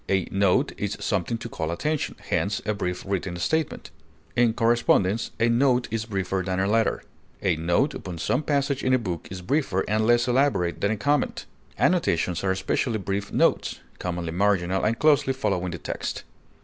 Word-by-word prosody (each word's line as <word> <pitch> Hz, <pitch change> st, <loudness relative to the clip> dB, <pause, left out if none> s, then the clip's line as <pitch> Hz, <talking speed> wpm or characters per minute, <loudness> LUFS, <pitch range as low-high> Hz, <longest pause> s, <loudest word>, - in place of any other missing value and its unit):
A 95 Hz, -2 st, +1 dB
note 100 Hz, -2 st, +2 dB
is -, -, -2 dB
something 115 Hz, -, -1 dB
to -, -, -7 dB
call 80 Hz, -, -4 dB
attention, 150 Hz, -, -2 dB
hence 100 Hz, +1 st, 0 dB
a 105 Hz, -, +1 dB
brief 90 Hz, -3 st, -3 dB
written 95 Hz, -2 st, -2 dB
statement; 160 Hz, -, -1 dB, 0.4 s
in 120 Hz, -1 st, +4 dB
correspondence, 115 Hz, -3 st, +2 dB
a 115 Hz, -, +4 dB
note 125 Hz, +1 st, +3 dB
is 115 Hz, 0 st, -2 dB
briefer 95 Hz, -3 st, -2 dB
than 95 Hz, 0 st, -2 dB
a 95 Hz, -, +2 dB
letter. 110 Hz, +2 st, +1 dB, 0.4 s
A 95 Hz, -4 st, +2 dB
note 85 Hz, -, +1 dB
upon 90 Hz, -5 st, -6 dB
some 125 Hz, -, 0 dB
passage 140 Hz, -2 st, 0 dB
in 130 Hz, 0 st, +3 dB
a -, -, +4 dB
book 90 Hz, -8 st, -4 dB
is 90 Hz, -1 st, -7 dB
briefer 130 Hz, -, 0 dB
and 110 Hz, +1 st, +1 dB
less 120 Hz, 0 st, +4 dB
elaborate 125 Hz, -9 st, +1 dB
than 100 Hz, -, +2 dB
a 110 Hz, -, 0 dB
comment. 145 Hz, +5 st, 0 dB, 0.3 s
Annotations 90 Hz, -, +1 dB
are 95 Hz, -, +1 dB
especially 95 Hz, +5 st, 0 dB
brief 100 Hz, 0 st, -3 dB
notes, -, -, +1 dB, 0.2 s
commonly 85 Hz, -2 st, -3 dB
marginal, 95 Hz, 0 st, +1 dB
and 115 Hz, +2 st, +1 dB
closely 145 Hz, -2 st, +3 dB
following 95 Hz, -8 st, -1 dB
the 85 Hz, -, -5 dB
text. -, -, -4 dB
100 Hz, 175 wpm, -25 LUFS, 90-120 Hz, 0.4 s, in